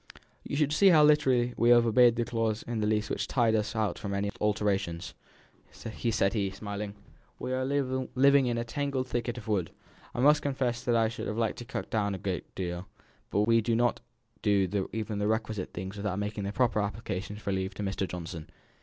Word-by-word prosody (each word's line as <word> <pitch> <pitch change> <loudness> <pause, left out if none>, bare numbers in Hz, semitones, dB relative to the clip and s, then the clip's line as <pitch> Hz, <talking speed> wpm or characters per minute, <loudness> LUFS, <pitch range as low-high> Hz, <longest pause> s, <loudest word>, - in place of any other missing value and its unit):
"You - - -4 0.2
see 195 +6 +5
how 160 -5 +7
literally 130 -5 +4
we 120 - +3
have 120 -1 +7
obeyed 120 +1 +5
the 120 0 0
clause 115 -2 -1
in 115 -2 -3
the 105 - 0
lease 105 0 +1
which - - -2
ties 115 -4 +2
us 110 +1 0
out 110 -2 -1
from 100 -2 -3
any 100 +1 -1
alterations," 100 -5 0 0.6
said 110 - -9 0.4
he, 100 -3 0
smiling. 100 +1 -6 0.4
"We 130 - -4
are 130 0 0
living 135 0 +2
in 120 -1 0
a 115 - -1
tangled 135 +2 -2
thicket 120 0 -2
of 110 - -9
wood. 95 -6 0 0.5
I - - -3
must 145 +3 +5
confess 130 -4 -1
that 120 - +2
I 115 -1 +4
should 115 +1 -5
have 105 - -3
liked 115 -2 -1
to 120 - -7
cut - - -5
down 100 -3 0
a - - -5
good 95 -1 -2
deal; 90 0 -4 0.4
but 100 - +1
we 115 +2 +4
do 115 +1 0
not 120 +1 +1 0.4
do 100 -2 +1
even 110 -1 -3
the 105 - 0
requisite 110 -3 -2
thinnings 95 +3 -6
without 100 -2 -2
making 105 0 -3
the 100 - -2
proper 120 -1 +1
application 105 -1 -4
for 105 -1 -4
leave 95 0 -2
to 105 - -4
Mr. 95 -1 -2
Johnson. 85 -2 -7
110 Hz, 205 wpm, -29 LUFS, 100-120 Hz, 0.6 s, how